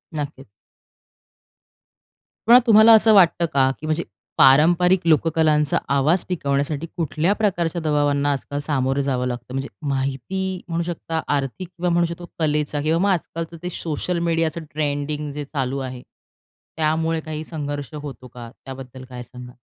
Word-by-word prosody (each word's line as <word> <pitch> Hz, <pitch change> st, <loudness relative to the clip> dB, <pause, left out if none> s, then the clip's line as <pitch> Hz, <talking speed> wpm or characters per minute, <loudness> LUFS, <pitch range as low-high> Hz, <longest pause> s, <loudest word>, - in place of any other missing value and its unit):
नक्कीच. 145 Hz, -6 st, -6 dB, 2.0 s
पण 245 Hz, +2 st, +9 dB
तुम्हाला 220 Hz, +1 st, +8 dB
असं 220 Hz, 0 st, +6 dB
वाटतं 175 Hz, -3 st, +5 dB
का, 135 Hz, -1 st, +4 dB
की 155 Hz, -, -8 dB
म्हणजे 155 Hz, +2 st, -1 dB, 0.3 s
पारंपरिक 175 Hz, +7 st, +5 dB
लोककलांचा 155 Hz, -2 st, +3 dB, 0.2 s
आवाज 155 Hz, +6 st, +2 dB
टिकवण्यासाठी 145 Hz, -1 st, -1 dB
कुठल्या 165 Hz, +3 st, 0 dB
प्रकारच्या 175 Hz, -5 st, -1 dB
दबावांना 145 Hz, -2 st, +1 dB
आजकाल 145 Hz, +1 st, -3 dB
सामोरं 135 Hz, -1 st, 0 dB
जावं 130 Hz, -2 st, -1 dB
लागतं? 125 Hz, 0 st, -6 dB
म्हणजे 135 Hz, +1 st, -3 dB, 0.2 s
माहिती 140 Hz, +8 st, -2 dB
म्हणू 170 Hz, 0 st, -1 dB
शकता, 165 Hz, -1 st, -4 dB
आर्थिक 145 Hz, +5 st, -2 dB
किंवा 180 Hz, 0 st, -3 dB
म्हणू 170 Hz, 0 st, +2 dB
शकतो 170 Hz, +1 st, -6 dB
कलेचा 150 Hz, -1 st, 0 dB
किंवा 160 Hz, +3 st, +1 dB
मग 200 Hz, +2 st, +2 dB
आजकालचं 165 Hz, -2 st, -3 dB
ते 180 Hz, -, -3 dB
सोशल 170 Hz, +2 st, -2 dB
मीडियाचं 165 Hz, -1 st, 0 dB
ट्रेंडिंग 145 Hz, 0 st, -2 dB
जे 145 Hz, +1 st, -5 dB
चालू 135 Hz, -2 st, -3 dB
आहे, 130 Hz, -2 st, -6 dB, 0.8 s
त्यामुळे 160 Hz, +1 st, 0 dB
काही 155 Hz, -1 st, -6 dB
संघर्ष 145 Hz, -2 st, -5 dB
होतो 145 Hz, -4 st, -8 dB
का? 120 Hz, -1 st, -10 dB, 0.2 s
त्याबद्दल 130 Hz, -1 st, -9 dB
काय 125 Hz, -1 st, -7 dB
सांगाल? 125 Hz, 0 st, -12 dB
150 Hz, 140 wpm, -22 LUFS, 140-170 Hz, 2.0 s, पण